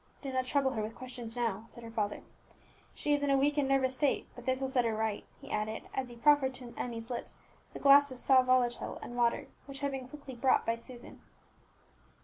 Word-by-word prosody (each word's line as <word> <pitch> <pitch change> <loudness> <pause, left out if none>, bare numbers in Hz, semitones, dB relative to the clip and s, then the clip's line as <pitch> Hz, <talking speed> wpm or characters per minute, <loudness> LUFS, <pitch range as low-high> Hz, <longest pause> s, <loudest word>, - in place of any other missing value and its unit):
"Do 270 -1 -4
not 255 0 0
trouble 270 0 +2
her 220 - -2
with 215 +2 -5
questions 245 -3 -7
now," 225 -4 -1
said 235 - -11
her 230 - -8
father; 210 -2 -2 0.7
"she 295 - 0
is 290 - +2
in 285 - 0
a 275 - +4
weak 285 +2 +2
and 275 - +1
nervous 265 -1 +2
state, 280 +1 0
but 245 - -12
this 260 0 +1
will 270 - -1
set 260 -2 +2
her 225 -2 0
right," 220 -1 -1 0.2
he - - -11
added, 215 +1 -2
as 260 -2 -2
he 240 - -10
proffered 270 0 +4
to 250 -2 -8
Emmie's 230 0 -5
lips 240 - -4 0.4
the - - -7
glass 285 0 +7
of 255 - -7
sal 260 +1 +5
volatile 255 -1 +1
and 240 - -7
water 235 -1 +1 0.2
which 275 0 -8
had 280 0 0
been 265 -2 -5
quickly 280 -1 -10
brought 255 +2 +2
by 230 - +2
Susan. 240 +1 -11
255 Hz, 225 wpm, -32 LUFS, 235-270 Hz, 0.7 s, glass